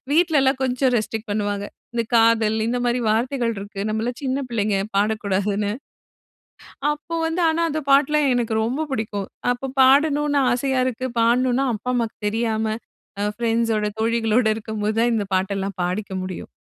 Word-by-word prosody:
வீட்ல 320 -1 +4
எல்லாம் 265 0 +2
கொஞ்சம் 255 0 +1
ரெஸ்ட்ரிக்ட் 220 0 -3
பண்ணுவாங்க. 205 -1 -1 0.3
இந்த 235 - +1
காதல், 225 -1 +4
இந்த 245 +2 0
மாரி 240 +1 +1
வார்த்தைகள் 235 +2 0
இருக்கு, 200 0 -7
நம்ம 215 +1 -1
எல்லாம் 245 0 -4
சின்ன 270 +1 -1
பிள்ளைங்க, 210 -3 0 0.2
பாடக்கூடாதுன்னு. 205 -1 0 1.2
அப்போ 300 +3 -6
வந்து, 325 +2 -1
ஆனா, 325 +1 +1
அந்த 310 +1 -2
பாட்டு 275 +1 +5
எல்லாம் 300 -2 +3
எனக்கு 230 -2 0
ரொம்ப 270 +7 -2
புடிக்கும். 210 -5 -3 0.2
அப்ப 255 +2 -5
பாடணும்னு 290 +2 +4
ஆசையா 260 +1 0
இருக்கு, 255 +1 -2
பாடணும்னா 250 +3 +2
அப்பா 235 +4 -3
அம்மாவுக்கு 230 -2 -2
தெரியாம, 220 0 -1 0.6
அ, - - 0 0.2
பிரண்ட்ஸோட, 225 -2 +1
தோழிகளோட 225 +1 +2
இருக்கும் 220 -1 -5
போது 215 +1 0
தான் 240 +1 +3
இந்த 205 -2 -1
பாட்டெல்லாம் 195 0 -2
பாடிக்க 190 +3 -3
முடியும். 185 -1 -7
230 Hz, 155 wpm, -22 LUFS, 215-265 Hz, 1.2 s, பாட்டு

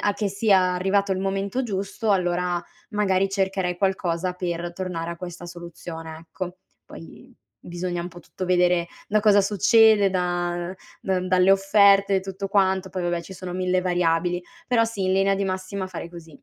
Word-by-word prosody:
a 205 -1 +1
che 205 -2 -1
sia 195 -2 +3
arrivato 195 +2 +1
il 185 - -2
momento 195 +5 -1
giusto, 205 0 -2
allora 180 -2 +1 0.3
magari 195 -2 +1
cercherei 190 -2 -1
qualcosa 180 -2 -1
per 175 -1 -4
tornare 170 -2 -4
a 170 - -6
questa 175 0 -8
soluzione, 170 -2 -8
ecco. 180 +2 -7 0.3
Poi 250 +9 -13 0.3
bisogna 175 0 -3
un 170 - -4
po' 175 0 -12
tutto 185 - -7
vedere 180 -1 +2 0.2
da 215 - +3
cosa 210 -1 +5
succede, 210 +1 +5
da 175 -1 -2 0.3
da 190 -1 0
dalle 185 0 +4
offerte 195 0 +5
e 190 - +1
tutto 195 +1 -5
quanto. 190 -1 +1
Poi, 185 0 -4
vabbè, 175 -1 -1
ci 180 - -11
sono 185 -1 -7
mille 185 0 0
variabili. 175 -1 +1 0.3
Però, 235 -3 +3
sì, 225 -3 -4
in 185 - +2
linea 195 +1 +3
di 200 - -2
massima 185 0 -3
fare 175 -2 -7
così. 165 -4 -13
185 Hz, 170 wpm, -24 LUFS, 175-195 Hz, 0.3 s, cosa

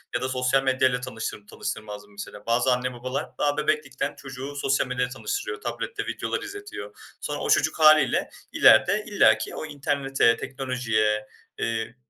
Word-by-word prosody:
ya 120 - 0
da 130 - -1
sosyal 130 +1 +1
medya 130 -1 +3
ile 125 0 -2
tanıştır 115 -4 -6
tanıştırmazdım 105 -1 -6
mesela. 105 0 -9
Bazı 120 +3 +2
anne, 125 0 -2
babalar 130 +3 -4
daha 145 0 +1
bebeklikten 145 -2 -1
çocuğu 135 +1 -8
sosyal 135 -1 +1
medya 125 0 -1
ile 125 - -9
tanıştırıyor, 405 - -4
tablette 460 - -4
videolar - - -3
izletiyor. 405 +1 -8 0.3
Sonra - - -3
o - - -3
çocuk - - +2
hâliyle 155 0 +5 0.2
ileride 180 - +5
illaki 205 - +3
o - - -5
internete, 140 -4 +1
teknolojiye, 115 -5 -1 0.3
eee, 115 0 -2
130 Hz, 155 wpm, -25 LUFS, 120-145 Hz, 0.3 s, hâliyle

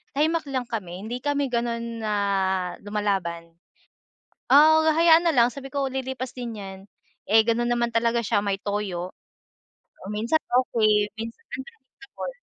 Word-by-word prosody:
tahimik 315 +2 +1
lang 260 -2 -1
kami. 190 -4 -5
Hindi 240 +3 -4
kami 285 -1 0
gano'n 235 -1 -2
na 215 - -1 0.7
lumalaban. 190 -5 -2 1.0
Ah, 310 +3 +7
hahayaan 330 +1 +5
na 330 - +4
lang 235 -1 +6
sabi 270 -1 -8
ko, 275 -1 0
"Lilipas 260 -1 -4
din 235 -3 -6
yan." 190 -1 -8 0.5
Eh, 220 +1 +7
gano'n 235 +1 +1
naman 240 0 +1
talaga 235 0 +2
siya, 205 - +2
may 200 -1 -1
toyo. 195 -3 -3 0.9
Kung 200 +2 -6
minsan 230 +9 +1
okey, 215 -4 +2
minsan 230 +1 -7 0.2
untouchable. 305 - -10
235 Hz, 140 wpm, -25 LUFS, 210-270 Hz, 1.0 s, Ah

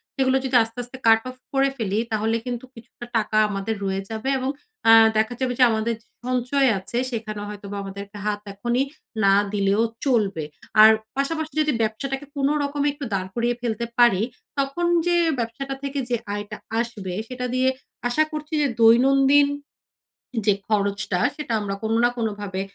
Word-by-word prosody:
সেগুলো 265 -1 +2
যদি 260 -1 -1
আস্তে, 225 +2 -10
আস্তে 245 +2 -9
কাট 225 0 +6
অফ 255 - -9 0.2
করে 275 0 +3
ফেলি, 210 -2 -1
তাহলে 220 +1 +1
কিন্তু 245 0 -4
কিছুটা 235 +1 -11
টাকা 215 0 0
আমাদের 200 +2 -2
রয়ে 195 0 -1
যাবে 225 +4 -3
এবং 260 +1 -2 0.4
আ - - +10 0.3
দেখা 220 +3 +1
যাবে 260 -2 0
যে - - +7
আমাদের 220 +1 0
যে - - -31 0.2
সঞ্চয় 255 +2 +2
আছে, 235 +5 -5
সেখানে 215 -2 -4
হয়তোবা 205 -1 -7
আমাদেরকে 200 +1 -8
হাত 205 -1 -1
এখনই 240 +6 0 0.4
না 195 - +6 0.2
দিলেও 200 +1 +2 0.2
চলবে। 205 - +1 0.4
আর 220 - +10 0.3
পাশাপাশি 315 +3 -2
যদি 300 0 +2
ব্যবসাটাকে 270 +6 -2
কোনরকমে 285 +1 0
একটু 290 -2 -6
দাঁড় 185 -1 -2
করিয়ে 240 0 +1
ফেলতে 235 -1 -2
পারি, 235 -5 +5 0.4
তখন 275 +6 -1 0.2
যে 350 - +2 0.2
ব্যবসাটা 240 +4 -3
থেকে 280 0 -2
যে 240 - +2 0.2
আয়টা 205 0 -5 0.2
আসবে, 215 -6 -4
সেটা 250 0 -5
দিয়ে 255 +1 +3 0.4
আশা 305 +6 +3
করছি 305 +1 -6
যে 285 - +3
দৈনন্দিন 270 +5 +6 1.0
যে 205 - +6 0.2
খরচটা, 200 -3 0 0.2
সেটা 300 -6 -4
আমরা 200 -1 -3
কোনো 220 +1 0
না 240 - +6
কোনোভাবে 205 -4 -3
235 Hz, 165 wpm, -23 LUFS, 210-270 Hz, 1.0 s, আ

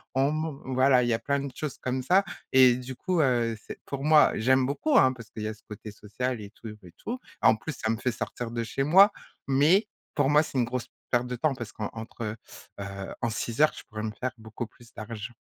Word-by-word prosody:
on 135 +2 +3
man 155 -1 -2 0.2
voilà, 130 -1 +5
il 120 - 0
y - - +3
a 115 - 0
plein 140 -1 0
de 140 -1 -5
choses 150 -1 -5
comme 130 0 -2
ça 185 +7 +4 0.3
et 130 -2 +7
du 125 +1 -7
coup, 180 +5 -1
heu, 120 -5 +2
c'est, - - -8
pour 140 +1 -4
moi 155 -1 +6
j'aime 130 +3 +3
beaucoup, 265 - +1
hein, 130 - +6
parce 115 -4 -11
qu'il 110 - -7
y 110 - -1
a - - -4
ce 110 - -21
côté 105 0 -8
social 115 +4 -4
et 100 -1 -9
tout 110 - -10
et 90 - -14
tout. 245 +3 -5 0.2
En 110 - +6
plus, 155 +9 -5
ça 110 - +1
me 115 - +1
fait 125 +1 -1
sortir 115 +1 -5
de 115 -1 -2
chez 135 +4 -2
moi, 190 +8 +7 0.4
mais, 155 +10 +4 0.3
pour 145 -2 +2
moi, 150 +1 +5
c'est 140 - -5
une 120 - +4
grosse 125 0 -4 0.2
perte 120 0 +2
de 125 - -3
temps 145 +3 +1
parce 120 -4 -7
qu'entre 110 0 -5 0.4
heu, 100 -1 -6
en 120 - +1
6 115 +2 -4
heures, 155 - +5
je - - -9
pourrais 105 0 -5
me 110 - -2
faire 130 0 -1
beaucoup 110 +1 -7
plus 120 0 -20
d'argent. 110 +2 -7
125 Hz, 245 wpm, -27 LUFS, 110-140 Hz, 0.4 s, et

